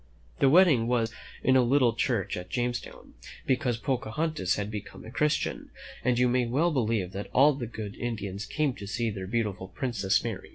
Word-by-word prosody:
The 135 Hz, -, +5 dB
wedding 150 Hz, -8 st, +5 dB
was 115 Hz, -2 st, +1 dB, 0.3 s
in 130 Hz, -, +4 dB
the 130 Hz, -, +6 dB
little 125 Hz, -1 st, +3 dB
church 115 Hz, -4 st, -1 dB
at 90 Hz, 0 st, -7 dB
Jamestown, 120 Hz, +1 st, -4 dB, 0.3 s
because 130 Hz, -3 st, +1 dB
Pocahontas 130 Hz, -, -1 dB
had 105 Hz, +1 st, -3 dB
become 105 Hz, -1 st, -8 dB
a 110 Hz, -, -9 dB
Christian, 150 Hz, +4 st, 0 dB, 0.3 s
and 125 Hz, -1 st, +2 dB
you 125 Hz, 0 st, +4 dB
may 125 Hz, 0 st, +1 dB
well 150 Hz, +9 st, +2 dB
believe 110 Hz, -, 0 dB
that 100 Hz, +2 st, -6 dB
all 145 Hz, +3 st, +6 dB
the 130 Hz, -4 st, -5 dB
good 105 Hz, -3 st, -7 dB
Indians 105 Hz, -4 st, -4 dB
came 150 Hz, -4 st, 0 dB
to 100 Hz, -, -8 dB
see 115 Hz, +1 st, -1 dB
their 95 Hz, -2 st, -6 dB
beautiful 105 Hz, -3 st, -2 dB
prin 125 Hz, +6 st, -4 dB
cess 95 Hz, -3 st, +1 dB
married. -, -, -5 dB
120 Hz, 190 wpm, -28 LUFS, 105-130 Hz, 0.3 s, the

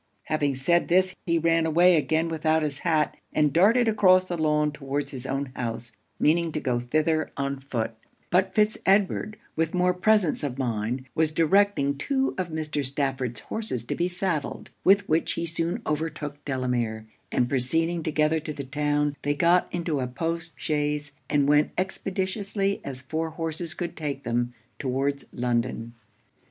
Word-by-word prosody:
Having 145 Hz, -3 st, 0 dB
said 170 Hz, +7 st, +2 dB
this, 185 Hz, +1 st, +3 dB
he 170 Hz, 0 st, +3 dB
ran 165 Hz, 0 st, +2 dB
away 175 Hz, +3 st, +5 dB
again 160 Hz, +1 st, +1 dB
without 160 Hz, -1 st, +1 dB
his 140 Hz, -2 st, -2 dB
hat, 155 Hz, -3 st, +1 dB, 0.2 s
and 150 Hz, -2 st, +2 dB
darted 225 Hz, +8 st, +5 dB
across 185 Hz, -4 st, +5 dB
the 180 Hz, -, -3 dB
lawn 150 Hz, -2 st, +2 dB
towards 140 Hz, 0 st, -3 dB
his 130 Hz, -1 st, -7 dB
own 135 Hz, 0 st, -2 dB
house, 120 Hz, -1 st, -4 dB, 0.3 s
meaning 165 Hz, +2 st, +2 dB
to 155 Hz, -, -1 dB
go 125 Hz, -4 st, 0 dB
thither 155 Hz, +6 st, +1 dB
on 140 Hz, 0 st, -2 dB
foot; 120 Hz, -4 st, -3 dB, 0.4 s
but 185 Hz, +1 st, +2 dB
Fitz 215 Hz, 0 st, +3 dB
Edward, 200 Hz, +2 st, +2 dB, 0.2 s
with 160 Hz, +2 st, 0 dB
more 180 Hz, 0 st, +3 dB
presence 190 Hz, -2 st, +2 dB
of 135 Hz, -3 st, -3 dB
mind, 120 Hz, 0 st, -2 dB
was 160 Hz, -1 st, +2 dB
directing 165 Hz, -4 st, +2 dB
two 270 Hz, -, 0 dB
of 185 Hz, -, -1 dB
Mr. 155 Hz, -2 st, -2 dB
Stafford's 130 Hz, -3 st, -2 dB
horses 210 Hz, -, -3 dB
to -, -, -2 dB
be 175 Hz, -, 0 dB
saddled, 180 Hz, -4 st, -3 dB
with 200 Hz, +1 st, +5 dB
which 160 Hz, +2 st, +1 dB
he 170 Hz, -, -2 dB
soon 170 Hz, +6 st, -2 dB
overtook 150 Hz, -2 st, -3 dB
Delamere; 125 Hz, -5 st, -1 dB, 0.3 s
and 125 Hz, -, +2 dB
proceeding 165 Hz, +7 st, 0 dB
together 155 Hz, 0 st, +1 dB
to 155 Hz, 0 st, -5 dB
the 140 Hz, -1 st, -5 dB
town, 145 Hz, +1 st, 0 dB
they 145 Hz, 0 st, 0 dB
got 170 Hz, +4 st, +3 dB
into 170 Hz, -4 st, -1 dB
a 130 Hz, -, -1 dB
post 165 Hz, +5 st, -3 dB
chaise, 150 Hz, -1 st, -1 dB, 0.2 s
and 145 Hz, -1 st, +3 dB
went 150 Hz, +1 st, +5 dB
as 185 Hz, -, +3 dB
expeditiously 195 Hz, +1 st, -2 dB
as 130 Hz, -2 st, -7 dB
four 160 Hz, +4 st, -2 dB
horses 160 Hz, +1 st, -4 dB
could 175 Hz, -, -4 dB
take 140 Hz, -3 st, -4 dB
them, 120 Hz, +1 st, -1 dB, 0.2 s
towards 135 Hz, +1 st, -1 dB
London. 120 Hz, -1 st, -1 dB
155 Hz, 165 wpm, -26 LUFS, 140-175 Hz, 0.4 s, away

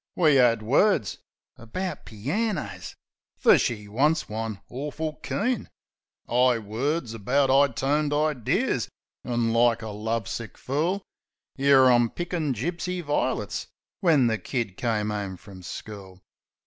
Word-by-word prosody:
We 155 Hz, -6 st, +5 dB
'ad 115 Hz, -3 st, +4 dB
words... 140 Hz, -, +2 dB, 0.4 s
about 180 Hz, +12 st, -5 dB
planners 115 Hz, -, -3 dB, 0.4 s
fer -, -, +6 dB
she 105 Hz, -3 st, -2 dB
wants 145 Hz, +10 st, +1 dB
one 110 Hz, -1 st, -4 dB
awful 150 Hz, +4 st, -4 dB
keen 240 Hz, +2 st, -2 dB, 0.6 s
'Igh 125 Hz, 0 st, +3 dB
words, 125 Hz, +4 st, -2 dB
about 130 Hz, +5 st, +1 dB
'igh 135 Hz, -2 st, +4 dB
toned 145 Hz, +3 st, +1 dB
idears 145 Hz, -, 0 dB, 0.3 s
an', 120 Hz, -2 st, 0 dB
like 115 Hz, -1 st, +3 dB
a 110 Hz, -, -5 dB
love 110 Hz, +1 st, -2 dB
sick 115 Hz, -2 st, -6 dB
fool, 165 Hz, +9 st, -1 dB, 0.6 s
'Ere 135 Hz, -2 st, +6 dB
I'm 120 Hz, -1 st, +4 dB
pickin' 170 Hz, -3 st, -2 dB
gipsy 175 Hz, -, -3 dB
vi'lits 130 Hz, -7 st, -1 dB, 0.3 s
when 155 Hz, -8 st, +4 dB
the 110 Hz, -2 st, +1 dB
kid 110 Hz, -1 st, -3 dB
come 105 Hz, -2 st, -1 dB
'ome 100 Hz, -3 st, -4 dB
frum 95 Hz, -1 st, -13 dB
school. 95 Hz, 0 st, -9 dB
125 Hz, 125 wpm, -26 LUFS, 110-150 Hz, 0.6 s, fer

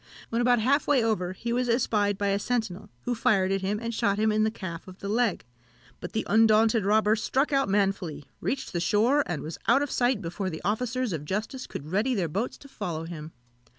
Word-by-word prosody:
When 230 Hz, +1 st, 0 dB
about 245 Hz, 0 st, +4 dB
half 275 Hz, +6 st, +2 dB
way 275 Hz, -5 st, +4 dB
over, 185 Hz, -5 st, 0 dB
he 235 Hz, +5 st, -3 dB
was 245 Hz, 0 st, 0 dB
espied 210 Hz, -4 st, +1 dB
by 200 Hz, 0 st, 0 dB
a 200 Hz, 0 st, +1 dB
sentinel, 220 Hz, -5 st, -2 dB
who 245 Hz, -, -1 dB
fired 195 Hz, -4 st, +2 dB
at 195 Hz, 0 st, 0 dB
him, 200 Hz, +2 st, -1 dB
and 230 Hz, 0 st, -4 dB
shot 200 Hz, -2 st, +1 dB
him 215 Hz, +1 st, +2 dB
in 215 Hz, 0 st, +2 dB
the 220 Hz, -, +3 dB
calf 180 Hz, -6 st, -7 dB
of 185 Hz, 0 st, -11 dB
the 200 Hz, -, -7 dB
leg: 220 Hz, -, 0 dB, 0.5 s
but -, -, -7 dB
the 220 Hz, -, -1 dB
undaunted 220 Hz, 0 st, +4 dB
robber 215 Hz, +1 st, +4 dB
struck 270 Hz, +6 st, 0 dB
out 275 Hz, -5 st, +2 dB
manfully, 195 Hz, -7 st, 0 dB
reached 265 Hz, -4 st, -3 dB
the 175 Hz, -, 0 dB
shore, 215 Hz, -, +3 dB
and 160 Hz, -5 st, -3 dB
was 155 Hz, +2 st, -6 dB
out 280 Hz, -, +5 dB
of 290 Hz, -, -4 dB
sight 245 Hz, -2 st, +2 dB
before 185 Hz, +1 st, -3 dB
the 160 Hz, -3 st, -7 dB
officers 240 Hz, +2 st, -1 dB
of 155 Hz, -3 st, -4 dB
justice 215 Hz, -, -4 dB
could -, -, -6 dB
get 155 Hz, -, -10 dB
ready 225 Hz, +7 st, +1 dB
their 185 Hz, -5 st, 0 dB
boats 200 Hz, +10 st, -3 dB
to 280 Hz, -, -14 dB
follow 175 Hz, -, -4 dB
him. 165 Hz, -2 st, -7 dB
215 Hz, 225 wpm, -27 LUFS, 190-240 Hz, 0.5 s, out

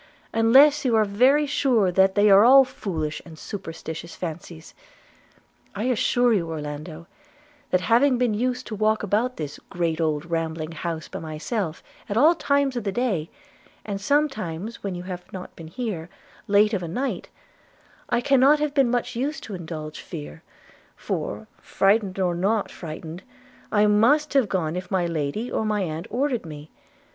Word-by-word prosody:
unless 270 Hz, +7 st, +5 dB
you 245 Hz, -4 st, +2 dB
are 215 Hz, -1 st, +4 dB
very 255 Hz, +9 st, +3 dB
sure 255 Hz, -9 st, +2 dB
they 190 Hz, +3 st, +4 dB
are 200 Hz, 0 st, +7 dB
all 265 Hz, +3 st, +8 dB
foolish 160 Hz, -, -4 dB
and 165 Hz, -2 st, -13 dB
superstitious 165 Hz, -3 st, -7 dB
fancies. 165 Hz, -1 st, -7 dB, 1.0 s
I 205 Hz, -, -3 dB
assure 245 Hz, 0 st, +2 dB
you, 170 Hz, -6 st, 0 dB
Orlando, 155 Hz, +1 st, -6 dB, 0.6 s
that 185 Hz, -, +2 dB
having 245 Hz, +7 st, +3 dB
been 240 Hz, -3 st, +1 dB
used 250 Hz, +3 st, -1 dB
to 215 Hz, -, -5 dB
walk 215 Hz, +1 st, +1 dB
about 220 Hz, +5 st, 0 dB
this 145 Hz, -2 st, -6 dB
great 170 Hz, -3 st, -1 dB
old 155 Hz, -1 st, 0 dB
rambling 165 Hz, -1 st, -3 dB
house 165 Hz, -1 st, -5 dB
by -, -, -7 dB
myself, 160 Hz, +3 st, -4 dB, 0.3 s
at 205 Hz, -, -1 dB
all 305 Hz, +7 st, +6 dB
times 280 Hz, -4 st, +1 dB
of 240 Hz, -, -2 dB
the 200 Hz, -, -1 dB
day, 195 Hz, -8 st, -1 dB, 0.6 s
and 200 Hz, -2 st, -4 dB
sometimes, 220 Hz, -, -1 dB
when 195 Hz, -2 st, -4 dB
you 175 Hz, -, -6 dB
have 180 Hz, -1 st, -8 dB
not 185 Hz, -1 st, -8 dB
been 165 Hz, -, -10 dB
here, 180 Hz, -3 st, -5 dB, 0.4 s
late 210 Hz, +2 st, +4 dB
of 195 Hz, -, 0 dB
a 170 Hz, -, -4 dB
night, 255 Hz, +11 st, -3 dB, 0.8 s
I 240 Hz, -, +1 dB
cannot 275 Hz, +3 st, +5 dB
have 300 Hz, -1 st, -1 dB
been 275 Hz, -4 st, +3 dB
much 245 Hz, 0 st, -1 dB
used 280 Hz, +6 st, -3 dB
to 215 Hz, -, -8 dB
indulge 160 Hz, -4 st, -6 dB
fear; 75 Hz, +1 st, -8 dB, 0.5 s
for, -, -, -4 dB
frightened 195 Hz, -1 st, +1 dB
or 180 Hz, -2 st, +1 dB
not 200 Hz, +5 st, 0 dB
frightened, 160 Hz, +1 st, -8 dB, 0.5 s
I 210 Hz, -1 st, +4 dB
must 250 Hz, +9 st, +3 dB
have 265 Hz, -7 st, +3 dB
gone 165 Hz, -4 st, -1 dB
if 180 Hz, 0 st, -5 dB
my 185 Hz, -3 st, +1 dB
lady 165 Hz, -, -3 dB
or -, -, -1 dB
my 210 Hz, -1 st, 0 dB
aunt 160 Hz, -1 st, -5 dB
had -, -, -8 dB
ordered 265 Hz, -2 st, 0 dB
me. 150 Hz, -2 st, -10 dB
200 Hz, 165 wpm, -24 LUFS, 165-245 Hz, 1.0 s, all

